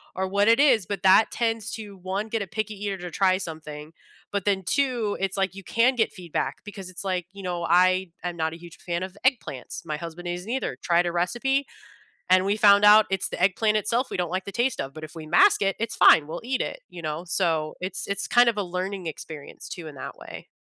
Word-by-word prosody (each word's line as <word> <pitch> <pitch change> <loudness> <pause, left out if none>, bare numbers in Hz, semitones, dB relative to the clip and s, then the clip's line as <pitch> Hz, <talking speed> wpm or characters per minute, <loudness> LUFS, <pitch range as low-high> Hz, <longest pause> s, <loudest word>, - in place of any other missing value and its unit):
or 190 0 -1
what 200 +2 +2
it 230 +2 +5
is, 255 -9 +4
but 200 -2 -4
that 190 +3 +6
tends 225 -2 -1
to, 210 -3 -7
1, 190 +3 -3
get 225 0 -2
a 200 - -4
picky 215 +1 -3
eater 200 -1 -4
to 180 -1 -7
try 185 +1 +2
something, 155 -3 -8 0.4
but 200 -2 -2
then 195 -2 +1
2, 245 -6 0
it's 195 0 -2
like 190 -2 0
you 195 - -9
can 235 +7 +2
get 225 -2 +1
feedback 160 -5 -4
because 200 -3 -8
it's 185 +1 -7
like, 180 -2 -2
you 200 0 -10
know, 175 -2 -3
I 185 +1 +4
am 175 -1 -3
not 160 -1 -2
a - - -8
huge 170 +1 -13
fan 175 0 -3
of 190 0 -7
eggplants, 225 - -1
my 150 - -3
husband 170 +2 -8
isn't 180 +4 -5
either, 255 - -2
tried 175 0 +2
a 175 - -1
recipe, 240 +11 0 0.6
and 185 0 +5
we 200 +1 +1
found 205 -1 +6
out 210 +1 +8
it's 190 -2 0
the - - -6
eggplant 210 +3 +2
itself 235 +5 0
we - - -5
don't 175 -2 -2
like 185 +1 -2
the 200 - -6
taste 240 +1 0
of, 135 0 -6
but 155 - -9
if 155 - -8
we 160 -1 -8
mask 395 - +5
it, 195 -1 +1
it's 230 0 -2
fine, 145 - +7
we'll 165 +2 -6
eat 255 +1 -1
it, - - -4
you 175 - -9
know? 155 +3 -4
So, 165 -4 0
it's 185 0 -4
it's 200 0 -2
kinda 240 -1 +5
a 205 - -1
learning 185 0 -4
experience 155 -2 -8
too 170 -4 -7
in 150 - -10
that 130 - -8
way. - - -10
190 Hz, 240 wpm, -25 LUFS, 175-215 Hz, 0.6 s, out